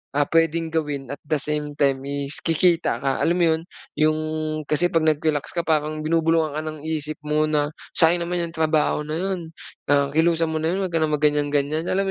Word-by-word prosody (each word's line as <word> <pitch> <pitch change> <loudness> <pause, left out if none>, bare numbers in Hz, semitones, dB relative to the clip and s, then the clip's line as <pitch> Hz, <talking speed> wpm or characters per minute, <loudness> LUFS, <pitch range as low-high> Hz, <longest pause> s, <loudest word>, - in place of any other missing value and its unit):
ah, 145 - +3
pwedeng 165 0 +2
gawin 145 -4 -2
at 140 - -6
the 155 - +1
same 150 0 -3
time 135 -2 +1
is 140 +1 -3
kikita 165 -6 +2
ka 135 0 0
alam 170 - +2
mo 170 - +4
yun? 160 - -6 0.4
'Yung 155 0 +3 0.5
kasi 175 +4 +2
pag 165 -1 +2
nag-relax 150 -1 0
ka 170 - 0
parang 155 -1 0
binubulungan 165 -1 +2
ka 155 - -1
ng 155 -1 -5
isip 155 -1 -3
mo 150 0 +1
na, 150 -1 0 0.2
"Sayang 170 +1 +4
naman 175 0 -1
'yung 170 0 -6
trabaho 155 -1 +1
na 155 - -3
yun. 190 +1 -2 0.5
Ah, 140 -1 +4
kilusan 165 +1 +2
mo 160 - -3
na 160 +2 0
yun. 195 - -1
'Wag - - -12
ka - - +3
nang 155 -1 +1
mag 150 - -6
ganyan-ganyan." 150 +2 +1
Alam 195 +1 0
155 Hz, 210 wpm, -23 LUFS, 150-165 Hz, 0.5 s, mo